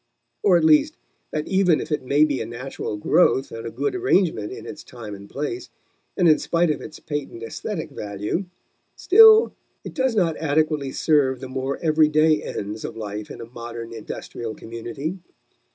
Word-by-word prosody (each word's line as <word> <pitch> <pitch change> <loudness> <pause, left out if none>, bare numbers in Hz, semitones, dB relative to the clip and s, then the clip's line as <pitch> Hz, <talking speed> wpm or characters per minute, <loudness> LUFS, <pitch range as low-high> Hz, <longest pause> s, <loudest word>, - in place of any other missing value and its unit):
Or, 185 -4 +5
at 170 - 0
least, 155 -1 +4 0.3
that 155 0 -3
even 190 -4 +3
if - - -6
it 150 - 0
may 140 +4 +3
be 145 -3 -1
a - - -3
natural 120 -2 -5
growth 135 +3 +3
and 115 0 -6
a - - -3
good 420 - -2
arrangement 190 - +1
in - - -8
its 150 - -8
time 115 -4 -9
and 100 0 -11
place, 340 - -4 0.5
and 180 - +4
in 155 - +5
spite 170 -1 +1
of 150 - -3
its 155 - -9
patent 145 -6 -5
aesthetic 160 - -5
value, 105 - -3 0.5
still 440 +3 +7 0.3
it - - -8
does 260 -4 0
not 170 -6 +1
adequately 155 -2 0
serve 135 -5 +2
the 130 - -7
more 135 +1 -3
everyday 155 -1 +4
ends 105 +2 -5
of 115 - -6
life 105 -1 -6
in - - -8
a - - -6
modern 115 -1 -8
industrial 115 0 -6
community. 120 +10 -6
145 Hz, 175 wpm, -23 LUFS, 115-165 Hz, 0.5 s, still